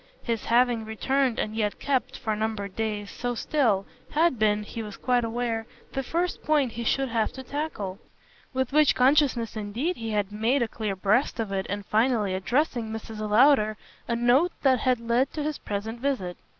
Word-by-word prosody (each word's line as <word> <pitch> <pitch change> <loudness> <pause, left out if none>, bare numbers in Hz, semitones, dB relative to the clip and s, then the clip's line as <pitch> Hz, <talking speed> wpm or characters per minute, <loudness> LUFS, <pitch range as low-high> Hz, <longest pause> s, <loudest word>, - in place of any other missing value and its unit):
His 230 -3 -2
having 240 -1 +3
returned 250 +3 0
and 215 0 -2
yet 210 -2 -1
kept, 270 -3 -1
for 220 -3 -2
numbered 210 -2 -3
days, 210 -2 -3
so 245 0 -3
still, 230 -8 +1 0.3
had 315 -5 +3
been, 210 -1 +2
he 225 +2 -6
was 210 -2 -7
quite 245 -1 +1
aware, 230 -1 -2 0.3
the 270 - -1
first 340 +7 -2
point 290 -5 +2
he 235 +1 -5
should 270 +3 +1
have 225 -2 0
to 265 - -8
tackle; 245 -9 -4 0.5
with 260 -1 -1
which 305 0 +5
consciousness 255 -4 +3
indeed 225 - -2
he 225 -1 -4
had 205 -2 -1
made 230 +5 +1
a - - -1
clean 215 -3 -3
breast 210 +8 +1
of 220 -3 -2
it 190 -1 -2
in 205 +1 -3
finally 215 -2 +1
addressing 240 +4 0
Mrs. 220 0 -6
Lowder 215 -2 +5 0.3
a 235 - 0
note 250 +9 +3
that 260 -3 +4
had 250 +1 +2
led 235 +3 +1
to 300 - -3
his 305 0 -3
present 215 +3 -4
visit. 245 -10 -1
230 Hz, 185 wpm, -26 LUFS, 215-265 Hz, 0.5 s, which